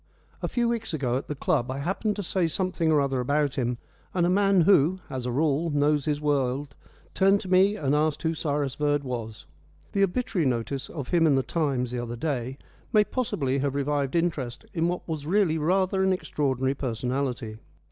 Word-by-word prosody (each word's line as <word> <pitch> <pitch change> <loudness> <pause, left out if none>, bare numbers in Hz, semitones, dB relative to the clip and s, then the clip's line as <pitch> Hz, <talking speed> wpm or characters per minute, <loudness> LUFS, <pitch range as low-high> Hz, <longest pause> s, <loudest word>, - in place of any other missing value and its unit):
A - - -1
few 240 -1 0
weeks 230 -7 -2
ago 125 -5 -1
at 135 - -6
the 150 - -4
club 125 -2 0
I 130 - -3
happened 190 +8 -1
to 205 - -4
say 180 -1 0
something 175 -1 0
or 150 - +4
other 135 -2 0
about 145 +2 +1
him, 125 -2 -1 0.4
and 175 -2 +3
a 175 - +2
man 195 -1 +4
who, 170 -1 +4
as 130 -2 -3
a - - -1
rule, 150 +4 +1
knows 145 -1 +2
his 150 -1 0
world 140 -2 0 0.4
turned 195 +1 +4
to 195 - -8
me 190 +3 +5
and 145 -9 0
asked 150 0 +1
who 165 0 +1
Cyrus 145 -4 -1
Verd 145 0 0
was. 115 -4 -5 0.5
The 200 - 0
obituary 195 - 0
notice 130 +2 -2
of 145 -6 -6
him 165 -2 +4
in 145 - +4
the 135 - +2
Times 135 -7 -1
the 125 - -3
other 120 0 -4
day 130 -1 -3 0.3
may 210 -1 +5
possibly 140 - -1
have 140 0 -1
revived 140 0 -1
interest 155 -8 -1
in 165 -2 +1
what 180 +1 -3
was 155 -3 -4
really 180 -3 +2
rather 190 +4 +1
an 190 0 +3
extraordinary 135 -7 -1
personality. 125 -2 -3
145 Hz, 200 wpm, -26 LUFS, 130-175 Hz, 0.5 s, me